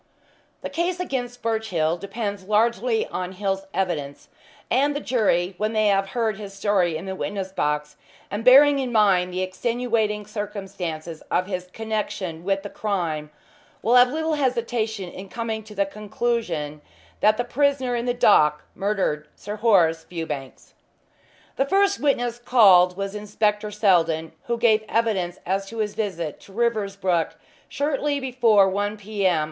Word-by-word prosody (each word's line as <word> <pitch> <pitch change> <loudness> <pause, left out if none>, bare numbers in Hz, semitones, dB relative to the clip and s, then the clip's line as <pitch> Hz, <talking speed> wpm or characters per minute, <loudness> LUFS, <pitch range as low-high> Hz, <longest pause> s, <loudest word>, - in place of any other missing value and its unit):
The - - -3
case 350 +2 -1
against 245 -8 -4
Birchill 220 -8 0
depends 200 +1 -5
largely 225 +2 +1
on 180 0 -4
Hill's 195 0 -2
evidence, 165 -8 -3 0.4
and 285 +2 +2
the - - -1
jury, 195 -9 +1
when 215 +1 0
they 215 -1 +3
have 195 0 +2
heard 220 -3 0
his 200 -2 -8
story 195 -5 +1
in 160 - -8
the 190 - -4
witness 190 0 -4
box, 150 -4 -2 0.3
and 205 +3 -3
bearing 275 +3 +7
in 260 -2 -2
mind 195 -5 +3
the 185 +1 -1
extenuating 220 +1 -1
circumstances 190 -6 -5
of 180 +1 +1
his 180 -2 -4
connection 200 -5 -4
with 195 +1 0
the 205 - -6
crime, 170 -8 -2 0.5
will 230 - +2
have 250 0 +7
little 320 +2 -1
hesitation 235 -7 -1
in 190 +2 -9
coming 225 +2 -3
to 215 -1 -12
the 200 0 +2
conclusion 195 -7 -3 0.4
that 215 0 +4
the 245 - 0
prisoner 260 0 +1
in 235 0 -2
the 245 - +1
dock 150 -10 +4
murdered 190 -7 -1
Sir 210 +1 -7
Horace 175 -8 +3
Fewbanks." 150 -6 -7 0.8
The 270 - +2
first 395 +5 +2
witness 245 -4 0
called 190 -7 +5
was 195 0 -3
Inspector 210 0 -1
Seldon, 175 -6 +2
who 235 0 -1
gave 225 -2 +3
evidence 200 -6 0
as 195 +2 -1
to 230 - -9
his 210 -2 -1
visit 180 -8 -3
to - - -17
Riversbrook 200 -6 0 0.3
shortly 285 0 -1
before 240 -7 +4
1 205 +2 -1
p. 205 -1 -1
m. 175 -3 +2
205 Hz, 150 wpm, -24 LUFS, 185-235 Hz, 0.8 s, bearing